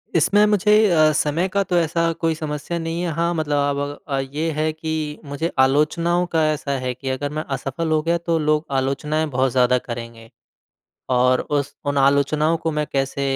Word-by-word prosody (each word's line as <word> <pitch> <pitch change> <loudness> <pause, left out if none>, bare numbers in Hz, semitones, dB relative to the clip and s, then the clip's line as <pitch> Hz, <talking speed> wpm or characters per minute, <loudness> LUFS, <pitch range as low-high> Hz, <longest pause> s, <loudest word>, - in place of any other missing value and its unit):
इसमें 205 +6 +4
मुझे 210 0 +3 0.2
अ, 155 -3 +4
समय 155 +5 +1
का 200 +1 +1
तो 180 -2 0
ऐसा 165 0 +1
कोई 165 0 -1
समस्या 155 +2 -4
नहीं 165 +1 -3
है। 175 -1 -1
हाँ, 170 +2 0
मतलब 155 -2 -1
आप 140 0 +1
अग 145 0 -3 0.2
अब 135 0 -2
ये 160 +2 0
है 155 +1 0
कि 155 -1 -4
मुझे 145 +4 -3
आलोचनाओं 155 +6 +2
का 160 -1 +3
ऐसा 145 -2 -3
है 130 0 -2
कि 130 +2 -6
अगर 130 +2 -2
मैं 155 +1 -3
असफल 135 +5 -3
हो 155 -1 +2
गया 170 +2 +1
तो 170 -1 -1
लोग 150 0 +1
आलोचनाएँ 150 +4 -1
बहुत 130 -1 +1
ज़्यादा 125 0 +3
करेंगे। 115 -2 -8 0.8
और 125 0 +3
उस 145 -1 -2
उन 145 0 -1
आलोचनाओं 140 +4 +2
को 165 0 -2
मैं 150 0 -1
कैसे 135 0 -1
150 Hz, 195 wpm, -21 LUFS, 140-165 Hz, 0.8 s, इसमें